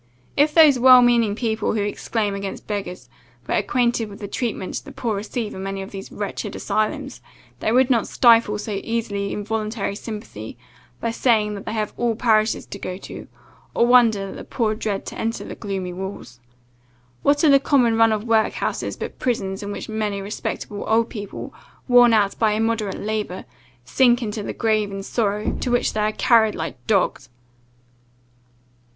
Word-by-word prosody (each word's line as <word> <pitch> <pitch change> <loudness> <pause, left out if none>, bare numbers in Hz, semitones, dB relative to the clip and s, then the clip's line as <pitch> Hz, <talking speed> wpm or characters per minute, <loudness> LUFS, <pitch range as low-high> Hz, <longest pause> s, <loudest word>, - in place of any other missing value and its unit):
If 295 +1 +3
those 305 -6 +7
well 255 0 +8
meaning 235 -4 +3
people 220 -2 -1
who 210 - 0
exclaim 205 0 -2
against 195 -1 -5
beggars, 195 -3 -5 0.4
were - - -1
acquainted 235 -3 +1
with 200 - -10
the 205 - -6
treatment 215 -4 -3
the - - -11
poor 225 -4 -2
receive 215 +2 -4
in 190 - -7
many 195 0 -4
of 190 - -10
these 195 -1 -8
wretched 205 0 -5
asylums, 265 +5 -2 0.4
they - - 0
would 255 +2 +4
not 230 -3 +2
stifle 230 -3 +4
so 210 -1 -4
easily 205 -4 -2
involuntary 215 0 -3
sympathy, 215 0 -8 0.4
by 230 - -1
saying 220 -3 +2
that 200 -1 -8
they 215 - -3
have 215 -2 -2
all 235 -2 0
parishes 220 -1 +2
to 200 - -9
go 185 -1 -5
to, - - -9 0.5
or - - +4
wonder 235 -5 +4
that - - -9
the - - -8
poor 220 -4 -1
dread 215 -2 -3
to - - -7
enter 225 +1 -2
the - - -7
gloomy 190 -4 -4
walls. 190 -9 -7 0.8
What 290 +2 +2
are 310 - +6
the 275 - +7
common 250 -5 +3
run 225 0 +5
of 215 -1 -1
workhouses, 225 -2 0
but - - -7
prisons, 195 -5 -2
in 205 0 -5
which - - -6
many 215 -2 -2
respectable 205 0 -5
old 230 +1 +2
people, 205 -3 -7 0.3
worn 245 -1 +7
out 205 -3 +2
by 220 -2 +3
immoderate 220 -2 -1
labour, 210 -3 -3 0.4
sink 240 - +3
into 210 -1 -4
the - - -4
grave 215 -2 +1
in 195 0 -5
sorrow, 210 -1 -1
to - - -2
which 245 0 +1
they 215 - -1
are 210 0 +1
carried 220 -1 +3
like 145 -6 -6
dogs!" 185 - +1
215 Hz, 175 wpm, -22 LUFS, 200-235 Hz, 0.8 s, well